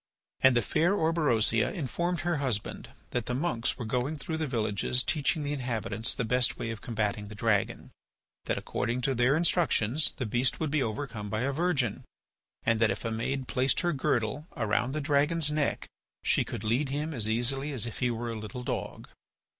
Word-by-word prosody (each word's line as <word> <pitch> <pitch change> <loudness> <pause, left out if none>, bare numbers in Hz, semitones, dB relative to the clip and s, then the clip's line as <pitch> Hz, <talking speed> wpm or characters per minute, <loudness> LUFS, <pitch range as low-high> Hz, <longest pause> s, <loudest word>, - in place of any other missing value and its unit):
And 130 -2 +6
the 120 - +2
fair 170 - +2
Orberosia 150 - +2
informed 175 - -2
her 175 -1 0
husband 125 -8 -1 0.2
that 120 -3 -2
the 125 - -1
monks 130 -5 0
were 120 - -4
going 125 +7 -1
through 160 +2 -4
the 160 -1 -1
villages 115 0 +1
teaching 150 +1 +1
the 145 0 -1
inhabitants 115 -5 -1
the 125 - -1
best 125 +2 +2
way 115 - -3
of 110 - -7
combating 105 -3 -2
the 105 - -9
dragon; 105 -2 0 0.5
that, - - 0
according 120 +2 -2
to 135 +2 +1
their 125 +3 +3
instructions, 155 - +2
the 130 - -2
beast 120 +4 0
would 155 -3 -1
be 150 -1 +2
overcome 110 -3 -3
by 110 +2 -1
a 135 +2 +1
virgin, 140 - 0 0.6
and 115 -1 +2
that 115 -1 +4
if 100 +4 -3
a 115 - -1
maid 130 +4 -2
placed 130 +3 +1
her 175 -1 +1
girdle 130 +2 0
around 120 +4 +1
the 155 - -1
dragon's 150 +2 +2
neck 150 -1 0 0.4
she - - +3
could - - -6
lead 125 +6 +1
him 150 +3 -2
as 110 -5 +1
easily 135 +6 -1
as 125 -5 0
if 115 - -6
he 125 - +2
were 120 0 -3
a 115 - -4
little 125 +4 -6
dog. - - -4
125 Hz, 195 wpm, -29 LUFS, 115-150 Hz, 0.6 s, And